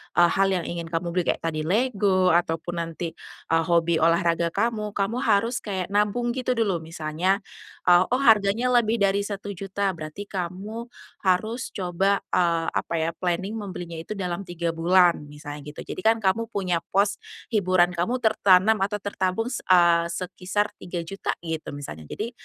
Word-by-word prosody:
hal 175 +3 +4
yang 185 -3 0
ingin 170 -1 -5
kamu 170 +1 -2
beli 180 0 +1
kayak - - 0
tadi 155 -2 -1
Lego, 195 -4 +2
ataupun 170 0 0
nanti, 165 0 -4 0.4
eee, 165 0 +3
hobi 170 -1 +3
olahraga 170 0 +2
kamu, 210 -1 -1
kamu 210 +5 0
harus 235 0 +2
kayak 190 -3 -4
nabung 210 +4 +1
gitu 255 0 -1
dulu 205 -7 +1
misalnya, 165 +4 -1 0.6
"Oh 250 - +1
harganya 220 +2 +4
lebih 235 -2 +3
dari 195 0 +3
1.000.000" 200 -1 -3
berarti 165 +3 -7
kamu 200 +5 -5 0.4
harus 220 +7 +1
coba 190 +2 0
eee, 170 -2 +2
apa - - -3
ya, 165 +1 0
planning 180 +2 -1
membelinya 175 -4 -6
itu 215 +6 -6
dalam 180 -1 -4
3 170 -1 -2
bulan, 170 -1 +3
misalnya 145 0 -8 0.2
gitu. - - -7
Jadi - - -5
kan 225 +2 +2
kamu 225 +4 +1
punya 185 -6 -1 0.2
pos, 200 0 +2 0.3
hiburan 185 -4 +3
kamu 175 +8 -1
tertanam 215 0 +4
atau 200 +1 -1
tertampung, 205 +4 -1
s 245 - -2
eee, 170 -2 +5
sekisar 185 +4 -2
3.000.000 175 +2 -4
gitu. 160 -2 -4 0.2
Jadi 80 - -6
185 Hz, 150 wpm, -25 LUFS, 170-205 Hz, 0.6 s, eee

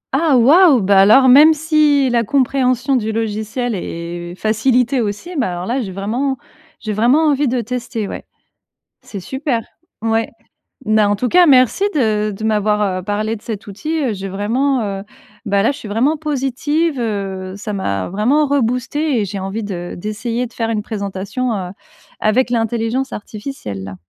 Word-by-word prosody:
Ah, 295 -2 +3
waouh! 285 - +6
Bah, 195 0 +4
alors 220 +7 +6
même 295 +5 +7
si 300 -3 +3
la 235 -1 +2
compréhension 260 +1 +1
du 220 -3 -1
logiciel 220 +2 -2
est 175 -1 -6
facilitée 240 +5 +1
aussi, 215 - -4
bah, 250 - 0
alors 175 +1 -5
là, 250 +6 -1
j'ai 200 -5 -5
vraiment 235 +8 -2 0.4
j'ai 215 -1 -4
vraiment 245 +9 +3
envie 290 0 +1
de 250 0 0
tester, 235 -2 -4
ouais. - - -7 0.8
C'est 200 - -7
super. 265 - -2 0.4
Ouais. 225 0 0 0.6
Bah, 215 -1 +3
en 205 - +2
tout 245 +5 -1
cas, 360 0 +6
merci 260 - +4
de 215 -7 +1
de 205 +2 -8
m'avoir, 210 -1 +1 0.2
heu, - - -14
parlé 215 +3 -2
de 210 - -12
cet 215 -3 -6
outil, 310 +11 -3
heu. 245 -5 0
J'ai 195 -1 -6
vraiment, 240 +7 0
heu, 195 -1 -4 0.4
bah, 200 -1 +1
là, 230 - +3
je 280 - -8
suis - - -9
vraiment 255 +9 +1
positive, 295 +1 -1
heu, 195 -4 -3
ça 210 +1 -5
m'a 100 - -2
vraiment 250 +11 +2
reboostée 265 +1 0
et - - -1
j'ai 200 +1 -5
envie 195 +4 -4
de 175 -4 -5
d'essayer 230 +5 -3
de 230 - -22
faire 230 -1 -2
une 215 -2 -1
présentation, 205 +3 -3
heu, 185 -3 -4 0.5
avec 230 +4 +2
l'intelligence 235 +3 -1
artificielle, 205 - -7
là. 95 -1 -7
225 Hz, 170 wpm, -18 LUFS, 205-265 Hz, 0.8 s, même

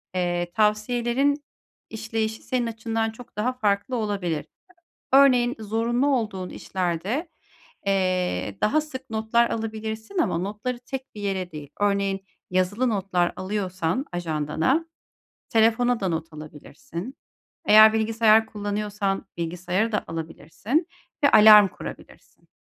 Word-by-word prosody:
eee, 175 -1 -1
tavsiyelerin 240 +7 +1 0.5
işleyişi 220 0 -3
senin 250 -2 -1
açından 225 0 -2
çok 235 +2 -14
daha 240 +5 0
farklı 210 0 0
olabilir. 195 -8 -2 0.7
Örneğin, 255 -3 +5
zorunlu 230 +5 0
olduğun 195 -6 -3
işlerde, 190 - -3 0.6
eee, 185 - 0
daha 305 +8 +3
sık 265 -4 -9
notlar 225 +2 +1
alabilirsin 220 - -4
ama 320 - +1
notları 210 +7 -4
tek 265 -1 -6
bir 210 - -8
yere 190 -3 -2
değil. 150 -2 -9
Örneğin 200 -1 +1 0.3
yazılı 185 +7 +1
notlar 190 -5 0
alıyorsan 185 +2 -2
ajandana, 165 - 0 0.7
telefona 230 +2 +3
da 190 - 0
not 165 -1 -3
alabilirsin. 165 - -9 0.5
Eğer 215 +1 +8
bilgisayar 220 0 +3
kullanıyorsan 205 -2 -3
bilgisayara 180 +6 -1
da 210 - 0
alabilirsin 165 - -3 0.4
ve 285 - +6
alarm 210 -1 +9
kurabilirsin. - - -12
215 Hz, 110 wpm, -24 LUFS, 185-235 Hz, 0.7 s, alarm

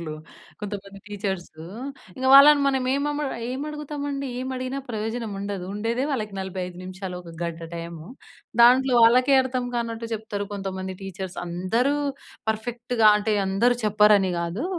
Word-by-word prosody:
సార్లు. 155 -2 -5 0.5
కొంతమంది 200 -1 -6
టీచర్స్, 195 -3 -3 0.7
ఇంగ 260 - -2
వాళ్ళని 285 +1 +9
మనం 265 -2 +1
ఏమమ 295 +1 -1 0.2
ఏం 260 +2 -3
అడుగుతామండి? 290 -2 -4
ఏం 260 - -4
అడిగినా 255 +2 -3
ప్రయోజనం 220 0 -3
ఉండదు. 200 -2 -4
ఉండేదే 230 +5 -1
వాళ్ళకి 215 -6 -3
45 185 -1 -5
నిమిషాలు, 185 0 -6
1 170 -1 -11
గంట 170 -1 -4
టైము. 170 -1 -7 0.6
దాంట్లో 255 +2 +6
వాళ్ళకే 255 +4 +5
అర్థం 255 -1 -2
కానట్టు 230 -1 -3
జెప్తారు 210 -2 -4
కొంతమంది 190 -1 -4
టీచర్స్. 190 0 -6
అందరూ 185 +11 0 0.6
పర్ఫెక్ట్‌గా 235 +1 +1
అంటే 210 0 0
అందరూ 235 +6 +2
చెప్పరని 210 -3 +4
గాదు. 170 - -3
215 Hz, 135 wpm, -24 LUFS, 190-255 Hz, 0.7 s, వాళ్ళని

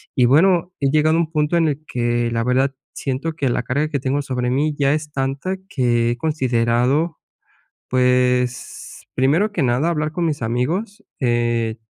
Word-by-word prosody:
y 125 - +4
bueno, 175 +6 +3
he 135 - +2
llegado 155 +1 +3
a - - +3
un 160 -1 -3
punto 150 +1 +1
en 165 -1 +3
el 150 +2 -4
que 120 -1 0
la 115 0 0
verdad 130 +3 +1 0.2
siento 140 +4 -3
que 145 -4 -1
la 125 - -1
carga 140 +5 0
que 140 -3 -1
tengo 135 +2 0
sobre 125 -3 -2
mí 145 +3 0
ya 140 -1 +2
es 150 0 -3
tanta 135 +8 -2
que 120 -7 +1
he 120 - -3
considerado, 130 +2 +1 0.7
pues, 125 -1 0
primero 160 +12 +2
que 205 - -1
nada 130 +6 +1
hablar 155 -2 -1
con 175 +1 -1
mis 150 -5 -2
amigos, 150 - -2 0.2
eh, 120 -2 0
135 Hz, 175 wpm, -20 LUFS, 125-155 Hz, 0.7 s, y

